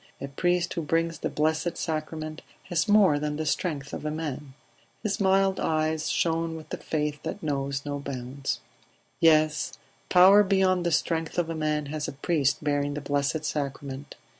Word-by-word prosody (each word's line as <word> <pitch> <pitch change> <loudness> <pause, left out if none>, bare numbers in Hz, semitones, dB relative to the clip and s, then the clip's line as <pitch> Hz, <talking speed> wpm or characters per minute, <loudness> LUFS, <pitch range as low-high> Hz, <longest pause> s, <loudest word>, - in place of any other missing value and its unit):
A 140 - -5
priest 175 +5 0
who 170 - -2
brings 165 +1 0
the - - -2
Blessed 160 +3 0
Sacrament 155 -1 -4 0.3
has 175 +4 +1
more 205 -8 +5
than 150 0 -2
the 155 +1 -3
strength 150 -3 -2
of - - -5
a 150 - -1
man." 150 -3 -5 0.5
His 210 -3 -1
mild 195 0 +3
eyes 155 0 0
shone 165 0 0
with 160 -1 -10
the - - -4
faith 150 -2 -2
that 165 +4 -5
knows 140 -2 -2
no 145 0 -3
bounds. 135 0 -4 0.6
"Yes, 155 -4 +3 0.4
power 190 +3 +8
beyond 190 -3 +2
the - - 0
strength 165 0 0
of 170 -2 0
a - - -3
man 155 -1 0
has 150 -1 -2
a - - -5
priest 145 0 0
bearing 145 -1 0
the 150 - -4
Blessed 145 +2 -1
Sacrament. 140 -1 -4
155 Hz, 170 wpm, -27 LUFS, 145-165 Hz, 0.6 s, power